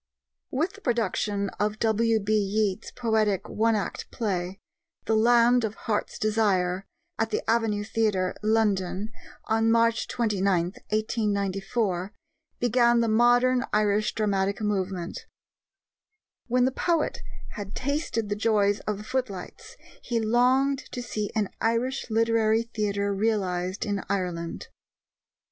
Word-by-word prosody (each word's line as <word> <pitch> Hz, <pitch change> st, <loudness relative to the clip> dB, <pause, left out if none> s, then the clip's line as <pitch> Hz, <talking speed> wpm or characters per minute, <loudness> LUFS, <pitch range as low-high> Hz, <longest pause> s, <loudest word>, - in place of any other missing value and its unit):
With 325 Hz, +9 st, -1 dB
the 405 Hz, -, -14 dB
production 210 Hz, -, 0 dB
of 210 Hz, +1 st, 0 dB
W.B. 220 Hz, -1 st, +1 dB
Yeats's 210 Hz, 0 st, 0 dB
poetic 220 Hz, -5 st, 0 dB
one 225 Hz, +1 st, +1 dB
act 205 Hz, -, -4 dB
play, 190 Hz, -3 st, -3 dB, 0.5 s
The 220 Hz, -, +2 dB
Land 240 Hz, +2 st, +5 dB
of 220 Hz, -1 st, -2 dB
Heart's 210 Hz, -2 st, -2 dB
Desire, 200 Hz, -4 st, +1 dB, 0.3 s
at 225 Hz, 0 st, +1 dB
the -, -, -3 dB
Avenue 220 Hz, -2 st, +1 dB
Theatre, 210 Hz, -4 st, 0 dB
London, 210 Hz, -2 st, +1 dB, 0.3 s
on 225 Hz, 0 st, +2 dB
March 230 Hz, 0 st, +3 dB
29, 200 Hz, -6 st, +1 dB, 0.3 s
1894, 205 Hz, -2 st, -1 dB, 0.5 s
began 240 Hz, 0 st, +3 dB
the 230 Hz, -, +1 dB
modern 245 Hz, +3 st, +4 dB
Irish 210 Hz, 0 st, +1 dB
dramatic 200 Hz, -2 st, 0 dB
movement. 190 Hz, -4 st, -3 dB, 1.2 s
When 250 Hz, +1 st, +3 dB
the 260 Hz, -, +2 dB
poet 330 Hz, +3 st, 0 dB, 0.3 s
had 205 Hz, -1 st, -7 dB
tasted 280 Hz, -5 st, -1 dB
the 205 Hz, -, 0 dB
joys 205 Hz, -1 st, +2 dB
of 210 Hz, -2 st, -1 dB
the 210 Hz, -, -8 dB
footlights, 245 Hz, -7 st, -5 dB, 0.2 s
he 235 Hz, -2 st, -1 dB
longed 255 Hz, +5 st, +3 dB
to 245 Hz, -, -4 dB
see 215 Hz, -3 st, -3 dB
an 215 Hz, -2 st, +1 dB
Irish 235 Hz, +4 st, 0 dB
Literary 225 Hz, 0 st, +2 dB
Theatre 205 Hz, -3 st, -1 dB
realized 190 Hz, -3 st, -1 dB
in 200 Hz, -2 st, -2 dB
Ireland. 180 Hz, -4 st, -3 dB
215 Hz, 120 wpm, -26 LUFS, 200-230 Hz, 1.2 s, Land